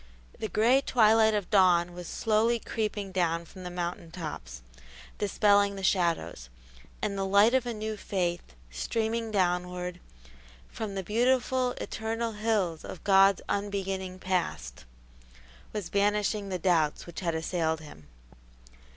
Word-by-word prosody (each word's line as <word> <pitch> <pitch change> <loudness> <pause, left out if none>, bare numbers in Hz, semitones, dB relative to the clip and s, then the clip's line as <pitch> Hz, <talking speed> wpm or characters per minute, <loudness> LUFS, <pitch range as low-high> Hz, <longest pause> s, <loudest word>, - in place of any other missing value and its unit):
The 220 - -2
gray 240 +5 +4
twilight 220 -3 +4
of 205 -2 -3
dawn 180 -3 +4
was 175 -1 -8
slowly 225 +2 +1
creeping 210 -3 -3
down 170 -2 0
from 185 +3 -13
the 180 - -5
mountain 175 -1 -4
tops, 105 - -7 0.6
dispelling 200 0 +3
the 195 - -7
shadows; 170 - 0 0.5
and 200 - -1
the 195 - -1
light 200 +4 +4
of 260 -2 +2
a 240 - -2
new 215 0 -4
faith, 175 - -3 0.2
streaming 225 - -2
downward 180 -2 -1 0.7
"From 210 -3 -5
the 195 - -3
beautiful, 250 +4 +1
eternal 225 +1 -3
hills 210 -7 -1
Of 180 - -9
God's 195 -1 +5
unbeginning 195 -2 -3
past," 175 - -3 0.9
was 210 -4 -5
banishing 205 0 +1
the 185 - -2
doubts 165 -4 +1
which 170 - -8
had 170 -3 -1
assailed 160 -1 -1
him. 145 - -13
195 Hz, 135 wpm, -28 LUFS, 175-215 Hz, 0.9 s, God's